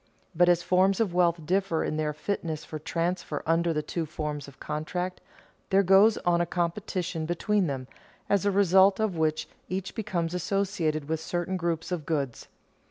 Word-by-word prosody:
But 175 +1 +4
as 175 -1 +3
forms 190 +2 +3
of 210 -6 +1
wealth 170 -2 +2
differ 185 -1 +1
in - - -2
their 155 -1 0
fitness 155 0 -3
for 155 - -6
transfer 170 0 -2
under 165 +1 +2
the 150 -1 -1
two 165 0 -3
forms 150 -2 -4
of 140 - -14
contract, 180 +4 -4 0.5
there 195 0 +4
goes 195 +4 +6
on 175 -1 +3
a 175 - 0
competition 175 -1 -2
between 190 +3 +1
them, 130 -3 -4 0.4
as 200 -1 +2
a 205 - +3
result 190 0 +5
of 215 -4 0
which 155 -1 0 0.2
each 190 0 -3
becomes 180 -7 -2
associated 180 -5 -1
with 160 0 -1
certain 175 +3 -2
groups 170 -1 -2
of 165 -5 -3
goods. 140 -7 -2
175 Hz, 170 wpm, -27 LUFS, 155-190 Hz, 0.5 s, goes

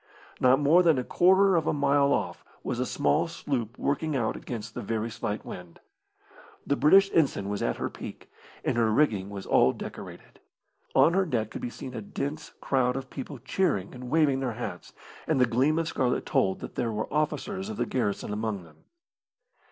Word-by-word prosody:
Not 130 +2 +5
more 150 +5 +5
than 165 -5 +4
a 125 - 0
quarter 190 +6 +4
of 160 -2 +1
a - - +2
mile 140 -1 +3
off - - -1 0.2
was - - -3
a - - 0
small 70 - +1
sloop 130 -8 -3
working 150 +2 -1
out 115 -4 0
against 115 -2 -6
the - - -5
very 115 +2 -2
slight 105 -1 -4
wind. 90 -2 -9 0.9
The 140 - +1
British 195 +7 +5
ensign 135 -11 +2
was 100 0 -3
at - - 0
her - - -2
peak, - - -9 0.4
and - - 0
her 115 -2 +3
rigging 105 -7 +2
was 100 -1 -7
all 65 - +4
decorated. - - -9 0.6
On 170 - +6
her 190 0 +2
deck 110 -7 -1
could - - -6
be 120 - -3
seen 125 +1 -8
a 115 - -5
dense 145 +9 -5
crowd 125 -2 +1
of 135 -1 -6
people 135 +1 -6
cheering 125 - -1
and 125 -1 -8
waving 145 -2 +3
their 130 -3 -2
hats, 120 +2 -6 0.4
and - - +2
the 125 - +6
gleam 130 +7 +2
of 165 -1 0
scarlet 125 -4 0
told 95 0 +1
that - - -7
there 120 -2 -1
were 110 +4 -4
officers 190 +6 -1
of 220 - -5
the - - 0
garrison 105 -4 -2
among 105 -3 -3
them. 80 -2 -18
130 Hz, 195 wpm, -27 LUFS, 110-155 Hz, 0.9 s, On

